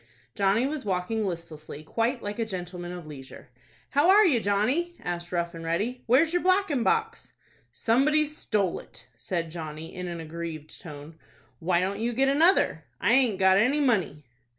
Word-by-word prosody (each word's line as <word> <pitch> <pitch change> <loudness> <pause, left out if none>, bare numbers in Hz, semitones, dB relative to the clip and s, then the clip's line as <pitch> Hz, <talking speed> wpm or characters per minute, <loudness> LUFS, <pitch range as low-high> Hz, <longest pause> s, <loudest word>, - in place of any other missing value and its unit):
Johnny 200 +5 +2
was 295 0 -3
walking 200 +2 -1
listlessly, 160 -4 -7
quite 235 - -1
like 205 +2 -5
a - - +2
gentleman 180 -3 -6
of 175 -2 -8
leisure. 135 -4 -11 0.4
"How 290 +6 +4
are 415 +2 +7
you, 280 -10 +4
Johnny?" 235 +13 0
asked 175 -1 -5
Rough 170 0 -1
and 165 -1 -8
Ready. 210 +10 -2
"Where's 300 +8 +4
your 355 - +2
blacking 370 -7 +2
box?" 450 - -1 0.4
"Somebody 295 +7 +2
stole 210 - -1
it," - - -12
said 170 -3 -3
Johnny, 160 -1 -7
in 180 -1 -5
an 170 -1 -5
aggrieved 160 -1 -7
tone. 155 -1 -10 0.4
"Why 175 0 +1
don't 195 +2 -2
you 235 +2 -1
get 270 +3 +2
another?" 325 +7 +3
"I 230 - +3
aint 250 -6 +4
got 190 0 +5
any 255 +8 +3
money." 190 - 0
200 Hz, 170 wpm, -27 LUFS, 170-270 Hz, 0.4 s, are